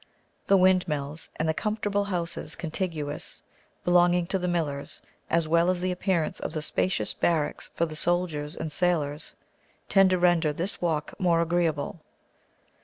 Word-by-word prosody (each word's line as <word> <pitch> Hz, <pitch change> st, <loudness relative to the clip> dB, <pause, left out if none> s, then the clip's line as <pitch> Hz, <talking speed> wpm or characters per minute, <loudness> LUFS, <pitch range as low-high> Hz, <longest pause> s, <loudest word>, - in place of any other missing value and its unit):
The 195 Hz, -, +6 dB
windmills, 165 Hz, -5 st, +1 dB
and 160 Hz, -, -1 dB
the 160 Hz, -, +2 dB
comfortable 205 Hz, +1 st, -1 dB
houses 170 Hz, -5 st, -1 dB
contiguous, 160 Hz, -3 st, -4 dB, 0.4 s
belonging 175 Hz, 0 st, +4 dB
to 190 Hz, -, +2 dB
the 180 Hz, -, -2 dB
millers, 155 Hz, -5 st, -2 dB, 0.3 s
as 165 Hz, -1 st, +2 dB
well 170 Hz, +2 st, +3 dB
as 185 Hz, -1 st, +1 dB
the 185 Hz, +1 st, -1 dB
appearance 180 Hz, -3 st, -1 dB
of -, -, -4 dB
the 155 Hz, -2 st, -3 dB
spacious 185 Hz, +4 st, 0 dB
barracks 155 Hz, -4 st, 0 dB
for 170 Hz, -, +2 dB
the 155 Hz, -2 st, -7 dB
soldiers 165 Hz, -3 st, -1 dB
and 160 Hz, -1 st, -4 dB
sailors, 155 Hz, -4 st, -1 dB, 0.5 s
tend 195 Hz, -1 st, +6 dB
to 185 Hz, -, +2 dB
render 175 Hz, -3 st, +3 dB
this 175 Hz, +6 st, -3 dB
walk 160 Hz, -4 st, -1 dB
more 175 Hz, -3 st, +3 dB
agreeable. 165 Hz, -2 st, 0 dB
170 Hz, 150 wpm, -27 LUFS, 155-180 Hz, 0.5 s, The